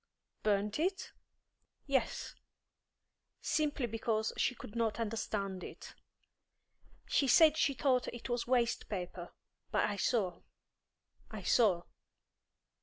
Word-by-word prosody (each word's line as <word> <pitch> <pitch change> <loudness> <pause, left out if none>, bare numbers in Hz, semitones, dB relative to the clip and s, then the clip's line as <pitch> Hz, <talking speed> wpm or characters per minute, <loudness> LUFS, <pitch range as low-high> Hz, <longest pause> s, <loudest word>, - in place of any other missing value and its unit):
"Burnt 210 +3 +1
it?" 375 +4 -1 0.7
"Yes; 265 -5 -1 1.1
simply 300 -4 0
because 225 -1 -1
she 250 - +1
could 210 - -10
not 230 -1 0
understand 205 -4 -2
it. - - -9 1.1
She 275 - +2
said 310 +4 +7
she 285 -3 +2
thought 255 0 +2
it 240 - -6
was 240 -1 -1
waste 240 -2 +1
paper, 180 -3 -5 0.4
but - - +2
I 205 - -3
saw, 195 -5 0 0.9
I 215 -4 -7
saw." 185 -4 +4
230 Hz, 110 wpm, -34 LUFS, 205-260 Hz, 1.1 s, said